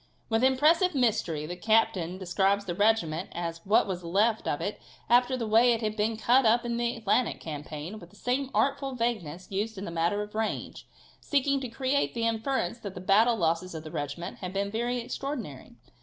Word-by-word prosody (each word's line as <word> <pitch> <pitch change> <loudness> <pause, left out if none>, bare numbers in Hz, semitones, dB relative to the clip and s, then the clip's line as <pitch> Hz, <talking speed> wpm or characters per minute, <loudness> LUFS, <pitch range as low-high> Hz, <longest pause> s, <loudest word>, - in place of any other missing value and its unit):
With 225 +1 +1
impressive 305 +7 +4
mystery 210 - +1
the 175 +3 -5
captain 205 -3 +1
describes 195 +2 +1
the 175 - -3
regiment 185 -4 +1
as 170 -1 -4
what 210 - +4
was 180 -3 -4
left 210 +6 +1
of - - 0
it - - -4 0.3
after 250 +2 +4
the 235 - -2
way 230 +3 +5
it 230 - -2
had 215 -1 -2
been 220 +1 0
cut 250 +4 +4
up 235 +2 +3
in 235 0 -1
the 240 +1 0
Atlantic 230 +2 0
campaign, 155 +5 -6
with 170 -3 -13
the 205 - -21
same 255 +5 -1
artful 275 -1 0
vagueness 200 -9 -3
used 210 +3 -2
in 195 - -5
the 170 - -5
matter 170 +5 0
of 210 - -10
the 215 - -3
range, 220 - -3 0.3
seeking 280 -1 +1
to 255 - -4
create 265 +4 0
the 230 -1 0
inference 230 -2 -1
that 200 -4 -7
the - - -6
battle 215 +6 +4
losses 170 -1 -1
of 155 - -6
the 155 - -9
regiment 145 +1 -5
had 180 -1 -5
been 200 0 -1
very 240 +3 -1
extraordinary. 240 - -5
215 Hz, 200 wpm, -28 LUFS, 180-240 Hz, 0.3 s, way